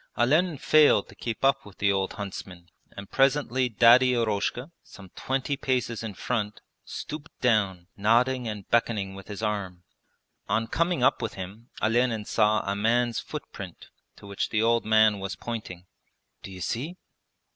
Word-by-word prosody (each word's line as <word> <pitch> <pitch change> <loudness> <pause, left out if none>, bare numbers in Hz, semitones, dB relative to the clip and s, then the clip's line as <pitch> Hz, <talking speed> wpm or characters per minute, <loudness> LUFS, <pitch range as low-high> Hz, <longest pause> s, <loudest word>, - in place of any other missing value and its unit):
Olenin 155 +7 +2
failed 145 -6 +4
to - - -13
keep 115 +2 -3
up 135 0 +3
with 100 -2 -15
the 100 0 +2
old 95 -1 -1
huntsman 95 -3 -8 0.3
and 100 0 -9
presently 135 -2 +2
Daddy 120 +3 +6
Eroshka, 115 +5 -1
some 95 -2 -14
twenty 135 +2 -1
paces 125 -4 -1
in 110 -3 -6
front, 105 0 -2 0.2
stooped 150 +1 -7
down, 100 -7 +1
nodding 120 +4 +2
and 105 -3 -6
beckoning 110 -4 0
with 95 0 -11
his 105 +1 -7
arm. 95 -4 -3 0.7
On 115 0 +1
coming 170 +3 0
up - - +3
with 115 -3 -3
him 100 +6 -9
Olenin 115 -1 +1
saw 105 -1 +2
a 100 0 -2
man's 115 +3 +1
footprint - - -8 0.3
to - - -15
which 100 0 -3
the 110 0 +1
old 115 0 +2
man 110 -1 +4
was 100 0 -4
pointing. 105 -7 -6 0.6
'D'you 95 -2 -9
see?' 145 - -3
115 Hz, 155 wpm, -26 LUFS, 100-125 Hz, 0.7 s, Daddy